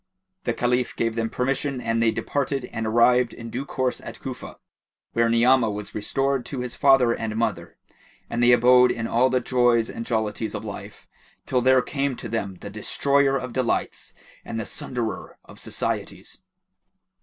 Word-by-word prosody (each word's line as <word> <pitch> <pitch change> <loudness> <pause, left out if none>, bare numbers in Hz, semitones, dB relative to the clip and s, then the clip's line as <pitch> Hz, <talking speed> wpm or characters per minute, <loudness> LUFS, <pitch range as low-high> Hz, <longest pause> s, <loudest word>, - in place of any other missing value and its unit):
The 120 - +1
Caliph 125 0 0
gave 115 -1 0
them 115 0 -2
permission 135 +2 -1
and 115 -1 -1
they 115 - +4
departed 135 +2 -2
and 115 -1 -2
arrived 120 +2 +3
in 115 -1 -8
due 135 +3 -4
course 130 -2 -2
at - - -8
Cufa, - - -7 0.6
where 115 0 +2
Ni'amah 120 +1 +4
was 105 0 -6
restored 135 +5 -1
to 135 -3 -4
his 125 -1 -4
father 135 -4 +4
and 110 -2 -4
mother, 105 -7 -2 0.5
and 120 - -2
they 120 0 +6
abode 125 +1 +6
in 115 - -3
all 120 +3 +2
the 130 0 +2
joys 120 -2 +2
and 115 - -5
jollities 110 -1 -2
of 110 - -5
life, 100 0 -9 0.4
till 125 -1 +1
there 130 0 +4
came 140 -2 -2
to - - -7
them 100 -4 -3
the 100 - -7
Destroyer 140 +6 +2
of 125 -2 -6
delights 130 -3 -1 0.3
and 115 - -5
the 110 - -3
Sunderer 120 0 -5
of - - -14
societies. - - -4
120 Hz, 170 wpm, -24 LUFS, 115-130 Hz, 0.6 s, they